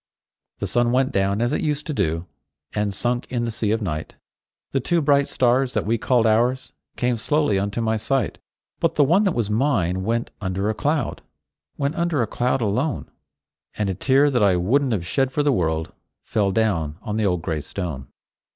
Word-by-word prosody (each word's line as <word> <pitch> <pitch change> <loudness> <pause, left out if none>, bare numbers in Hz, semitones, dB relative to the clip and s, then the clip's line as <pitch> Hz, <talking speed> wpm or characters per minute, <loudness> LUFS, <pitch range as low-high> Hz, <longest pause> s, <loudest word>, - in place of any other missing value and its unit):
The - - -3
sun 120 0 +1
went 130 +1 +2
down 100 +3 +1
as 120 +4 0
it - - 0
used 150 -2 -1
to 155 - -3
do, 85 - -1 0.5
And 105 -1 0
sunk 120 +5 -2
in 120 -2 -1
the 115 - -2
sea 110 -1 -2
of 110 +1 0
night; 80 -5 -4 0.6
The 135 - +1
two 170 +7 +1
bright 140 -2 +3
stars 125 +1 +1
that - - 0
we 115 +2 +1
called 120 -1 +2
ours 120 +4 +1 0.2
Came 125 -1 0
slowly 145 -4 +1
unto 100 +4 -2
my 110 -1 +1
sight; 120 +1 -1 0.4
But - - +1
the 145 - +5
one 175 +9 +3
that 190 - +1
was 110 -3 -1
mine 105 - +1
went 115 +3 -1
under 95 +2 -1
a - - -2
cloud— 145 +2 -1 0.6
Went 140 +1 0
under 170 -6 0
a - - 0
cloud, 125 +4 0
alone; 120 +8 -1 0.7
And 105 -2 0
a - - -2
tear 135 +8 +3
that 125 -3 +1
I 100 -3 +4
wouldn't 125 +10 +2
have 95 -6 -1
shed 135 +7 0
for 145 +2 0
the 145 -1 +3
world, 80 -5 -1 0.3
Fell 100 -3 0
down 85 -8 0
on 105 -2 -3
the 110 -2 +2
old 90 -3 -1
gray 80 -4 -2
stone. 75 -5 -5
115 Hz, 200 wpm, -23 LUFS, 100-135 Hz, 0.7 s, the